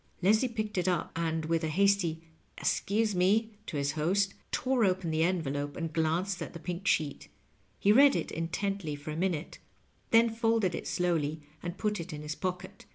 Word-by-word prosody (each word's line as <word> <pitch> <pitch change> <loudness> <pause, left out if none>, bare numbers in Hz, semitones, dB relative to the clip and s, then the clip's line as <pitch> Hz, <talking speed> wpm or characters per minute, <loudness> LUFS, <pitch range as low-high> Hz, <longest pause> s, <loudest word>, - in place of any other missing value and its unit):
^' - - -16
Leslie 215 +7 +4
picked 215 -4 -3
it 180 - -1
up, 180 -3 0
and, 160 -1 -1
with 165 0 0
a - - +1
hasty 175 -1 +2 0.2
" - - -38
Excuse 215 +1 +1
me 205 +5 +2
^' - - -38
to 150 - -3
his 140 0 0
host, 190 +6 +1 0.2
tore 255 -2 +1
open 185 -4 +1
the 155 0 +1
envelope 145 -5 -1
and 165 -2 -3
glanced 170 +4 0
at - - -5
the 170 - -7
pink 180 +3 -5
sheet. 150 -3 0 0.5
He 200 - +4
read 275 +5 +7
it - - -2
intently 170 0 -2
for 145 +2 -7
a - - -4
minute, 170 -2 -2 0.5
then 230 0 +5
folded 225 -4 +1
it - - -5
slowly 160 -4 0 0.2
and 175 +1 -5
put 210 -2 -1
it 170 +2 -6
in 150 0 -6
his 150 0 -3
pocket. 180 +1 -5
180 Hz, 200 wpm, -30 LUFS, 160-200 Hz, 0.5 s, read